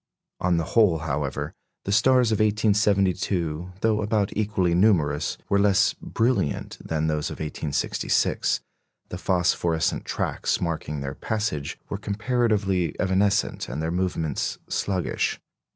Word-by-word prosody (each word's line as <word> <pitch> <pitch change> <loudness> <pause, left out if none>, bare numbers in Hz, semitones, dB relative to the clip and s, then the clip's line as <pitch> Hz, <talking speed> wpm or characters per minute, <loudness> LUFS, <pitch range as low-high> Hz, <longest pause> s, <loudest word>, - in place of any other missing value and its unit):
On 90 -1 +2
the 85 - +1
whole, 105 -8 +5
however, 75 -3 -3 0.3
the 100 - -1
stars 125 +3 +4
of 110 - +1
1872, 100 -5 +1
though 110 -1 +2
about 105 -1 0
equally 100 -5 +1
numerous, 80 -6 +2
were 100 - +2
less 100 -1 +4
brilliant 115 - -1
than 80 -1 -1
those 75 -1 -1
of - - -6
1866; 75 -1 0 0.5
the - - -6
phosphorescent 85 -3 +1
tracks - - -1
marking 75 -4 -3
their 70 0 -4
passage 105 -9 -3
were 100 - -4
comparatively 105 -4 0
evanescent 100 +2 +1
and 65 - -4
their 80 +1 -1
movements 85 -4 -1
sluggish. 95 -4 -1
95 Hz, 120 wpm, -25 LUFS, 80-105 Hz, 0.5 s, whole